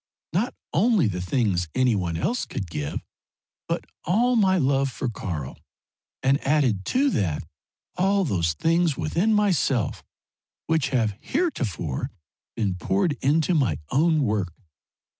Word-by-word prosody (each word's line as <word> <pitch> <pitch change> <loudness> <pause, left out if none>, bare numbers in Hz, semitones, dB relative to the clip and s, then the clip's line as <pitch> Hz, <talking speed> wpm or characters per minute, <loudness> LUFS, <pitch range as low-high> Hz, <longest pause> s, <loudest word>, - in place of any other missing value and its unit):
Not 210 +9 0 0.2
only 205 - +3
the 90 -3 -3
things 90 -4 0
any 130 -2 +3
one 85 -4 -1
else 240 - -1
could 95 - -4
give, 75 -2 -3 0.7
but - - -2 0.2
all 235 +8 +2
my 190 -4 +4
love 135 -3 +2
for 130 0 -3
Karl, 80 - -5 0.6
and 135 +1 +2
added 135 -10 +2
to 275 +2 +2
that 85 - 0 0.5
all 195 +1 +2
those 85 - +1
things 165 - +1
within 175 +8 +1
myself 185 - +1 0.6
which 160 -4 +1
have 110 -6 +1
heretofore 125 - -2 0.5
been 105 -4 0
poured 190 - +1
into 155 +5 +2
my 140 -7 +2
own 155 +1 +3
work. 105 -6 0
135 Hz, 130 wpm, -25 LUFS, -, 0.7 s, my